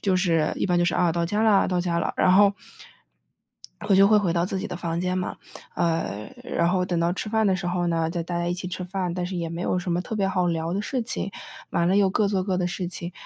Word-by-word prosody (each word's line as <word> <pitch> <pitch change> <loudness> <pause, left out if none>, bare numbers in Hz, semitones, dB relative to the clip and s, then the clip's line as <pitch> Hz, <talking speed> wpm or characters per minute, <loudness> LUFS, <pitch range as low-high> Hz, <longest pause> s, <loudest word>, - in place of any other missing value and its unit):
就 190 -2 +1
是 165 -4 +1
一 - - 0
般 175 -1 +2
就 175 - +3
是， 175 - +1
啊， 175 -2 +2
到 170 0 0
家 210 +5 0
了， 210 -3 +4
到 180 -1 +1
家 170 -1 0
了， - - -1
然 185 - +4
后 200 +1 +6 1.4
我 195 - +6
就 195 +1 +7
会 215 0 +5
回 190 -5 +1
到 170 0 +1
自 190 0 -3
己 - - -4
的 180 - -5
房 170 -1 -3
间 180 +1 -1
嘛， 185 - -3 0.4
呃， 165 - -1
然 170 - 0
后 180 0 +1
等 175 -2 -1
到 170 +1 +2
吃 210 +3 -4
饭 220 -1 +2
的 190 - +3
时 175 -1 -5
候 175 0 0
呢， 165 -1 0
再 175 -1 -2
大 170 +1 -4
家 175 0 -1
一 175 - 0
起 180 0 -5
吃 180 0 -5
饭， 180 -1 -3
但 180 -1 -2
是 185 +1 -5
也 170 -1 -3
没 170 +1 -5
有 180 0 0
什 175 0 -3
么 175 - +1
特 220 - -5
别 195 -2 +1
好 185 -2 +1
聊 165 0 -1
的 200 - -1
事 255 +3 -2
情， 200 -3 -4 0.4
完 170 0 +1
了 195 +2 +3
又 195 -2 +4
各 205 +1 +1
做 195 -2 0
各 185 -1 -1
的 180 -1 0
事 180 -1 -3
情， 175 -1 -6
180 Hz, 305 characters per minute, -25 LUFS, 170-195 Hz, 1.4 s, 就